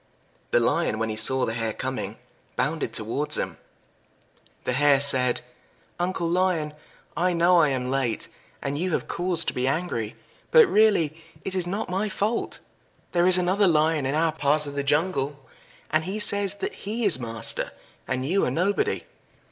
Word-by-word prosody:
The - - +3
Lion, 110 - +1
when 110 0 -1
he 110 - -3
saw 130 +4 +2
the 110 - -3
Hare 115 -1 -2
coming, - - -4 0.4
bounded - - -1
towards - - -1
him. - - -4 1.0
The 125 - -1
Hare 140 +1 +4
said 130 -3 +5 0.6
"Uncle 175 -1 -1
Lion, 170 -3 0 0.4
I 180 +1 +1
know 175 +1 +4
I 155 - +4
am 130 -1 -2
late, 130 -4 -1 0.4
and 140 +1 -2
you 180 0 -1
have - - -1
cause 175 -1 -1
to - - -2
be 125 +1 -1
angry. 135 -8 -2 0.3
But 475 -1 +7
really 210 - +3 0.3
it 195 - -3
is 185 -2 -1
not 200 +5 -3
my 195 +4 -1
fault. 210 +4 -2 0.5
There 175 0 +3
is 185 0 +8
another 185 +3 +2
Lion 155 -3 +2
in 135 - -1
our 160 +1 +2
part 150 0 +1
of 145 - -5
the 140 - -1
jungle, 145 -1 0 0.5
and 155 0 +2
he 195 +3 -3
says 205 -1 +1
that - - -4
he 220 +3 -4
is 180 -10 +5
master, 115 -2 -3 0.4
and 130 0 -2
you 190 +7 +1
are - - +1
nobody. 200 - 0
160 Hz, 170 wpm, -25 LUFS, 135-185 Hz, 1.0 s, is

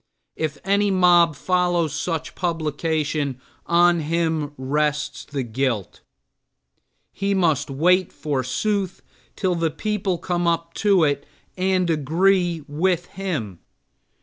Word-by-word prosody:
If 155 -2 -3
any 200 +1 +2
mob 175 -4 +5
follows 175 -2 +1
such 160 +1 -3
publication 155 -4 -1 0.3
on 175 0 +4
him 160 -1 -1
rests 150 +3 -1
the 140 -2 -3
guilt. 120 -4 -2 1.1
He 200 0 -1
must 160 -7 +1
wait 180 +6 +2
forsooth 155 - -2 0.3
till 185 -3 0
the 165 -1 0
people 190 +2 -2
come 175 0 -1
up 170 0 0
to 200 -5 +4
it 145 -2 0 0.3
and 185 -1 +1
agree 170 +2 +2
with 170 +4 0
him. 145 - -4
165 Hz, 110 wpm, -22 LUFS, 145-180 Hz, 1.1 s, mob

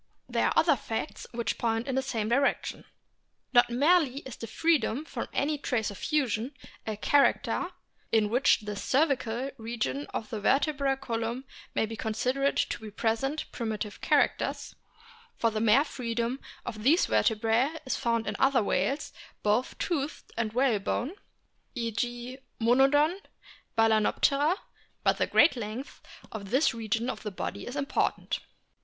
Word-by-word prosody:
There - - +1
are - - +1
other 320 -3 +5
facts 225 +3 -5
which 235 -3 -2
point 225 0 0
in 265 - -1
the 265 - +2
same 230 -5 -2
direction. 275 +5 0 0.7
Not 240 -1 +6
merely 285 +1 +3
is 265 -6 -8
the 230 - -7
freedom 290 0 +1
from - - -5
any 295 +1 0
trace 230 -7 -1
of 200 - -9
fusion 260 -3 0 0.3
a 215 -1 -2
character 280 +6 +2 0.4
in 215 -2 +3
which 245 0 +4
the 210 -1 -5
cervical 265 0 0
region 235 +5 -3
of 215 - -5
the 220 - -3
vertebral 275 +3 +2
column 235 0 -3 0.3
may - - +2
be 225 +1 -6
considered 255 +6 0
to 220 - -1
present 235 +8 -1
primitive 215 -3 -4
characters - - +1 0.6
for 230 - +2
the 215 0 -2
mere 230 +5 +5
freedom 240 -1 -2 0.3
of 215 - -5
these 300 - +4
vertebrae 225 +4 +2 0.2
is 260 - -1
found 230 -1 0
in - - -3
other 265 -3 +4
whales, 205 +10 0 0.3
both 210 +5 +1
toothed 305 -4 -3
and 220 -2 -1
whalebone 245 +1 +1 0.6
(e 230 -2 -2
g, 240 +3 -3 0.2
Monodon, 275 +9 +4 0.6
Baltznoptera) 225 - +3 0.5
but - - +2
the - - +2
great 295 +1 +5
length 235 +3 -6 0.3
of 200 -3 -7
this 265 +5 +3
region 230 +1 -1
of 260 - -3
the 210 - -4
body 190 - -5
is 245 - -6
important. 285 0 -1
240 Hz, 145 wpm, -29 LUFS, 225-275 Hz, 0.7 s, Not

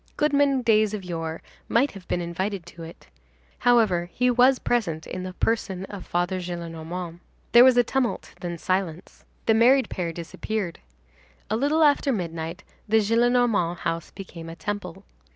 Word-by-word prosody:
Goodman 285 -3 +2
Days 215 -2 +3
of 200 - -6
Yore 165 -2 -5 0.3
might 260 +5 +3
have 195 -3 -12
been 175 - -1
invited 180 +2 -3
to 170 -1 -12
it. 165 +1 -11 0.5
However, 215 -8 +3
he 250 +5 +2
was 250 +2 +5
present 170 -13 -1
in 185 - -5
the 185 0 -6
person 190 -3 -1
of 195 -2 -9
Father 175 +2 -1
Gillenormand. 170 0 -6 0.3
There 240 +1 +9
was 255 -1 +6
a 245 - +6
tumult, 255 0 -2
then 175 -2 -4
silence. 185 -1 -3 0.2
The 225 - +4
married 245 +2 +4
pair 175 -2 -2
disappeared. 175 +3 -4 0.7
A - - +2
little 290 +7 +2
after 290 -1 +3
midnight, 165 -5 -4 0.3
the 220 - +4
Gillenormand 230 -5 +2
house 165 -1 -3
became 170 -4 -9
a 165 - -8
temple. 195 -1 -5
195 Hz, 155 wpm, -25 LUFS, 170-235 Hz, 0.7 s, There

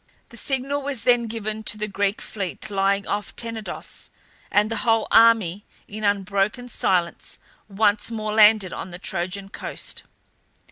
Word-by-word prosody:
The - - -14
signal 275 +3 -1
was 275 -5 -1
then 240 -1 +3
given 220 -1 -4
to 210 -1 0
the 215 0 -3
Greek 200 0 -1
fleet 200 0 -4
lying 195 0 +1
off 205 0 -3
Tenedos, 230 -2 -4 0.4
and 210 +2 +2
the 225 - -1
whole 225 -2 +2
army 220 -5 +5 0.2
in 215 +1 -7
unbroken 200 +4 0
silence 180 -6 0 0.3
once 205 +1 +2
more 215 -2 -3
landed 210 -3 +5
on - - -6
the 175 - -8
Trojan 190 +1 -4
coast. - - -6
210 Hz, 145 wpm, -23 LUFS, 195-225 Hz, 0.4 s, army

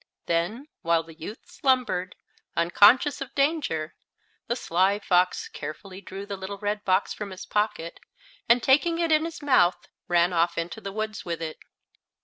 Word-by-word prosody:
Then, 175 - -1
while 165 -1 +2
the 165 0 -13
youth 170 +8 -9
slumbered, 230 -9 0 0.4
unconscious 205 - +5
of 275 -1 -7
danger, 275 - 0 0.5
the 240 - 0
Sly 190 -2 +1
Fox 180 -3 +1
carefully 185 +6 -8
drew 195 +1 -8
the 200 - -5
little 190 +1 -6
red 205 +1 -2
box 185 -2 +1
from 210 -1 -6
his 185 -1 -8
pocket, 210 -6 -2 0.5
and, 235 0 +5
taking 315 +5 +3
it 335 -1 0
in 310 +1 +4
his 330 -2 -7
mouth, 180 -11 +4 0.3
ran 175 +1 +3
off 170 0 +1
into 170 +6 -4
the 195 - -5
woods 215 +1 -4
with 170 -1 -4
it. 160 -1 -5
195 Hz, 160 wpm, -26 LUFS, 170-245 Hz, 0.5 s, unconscious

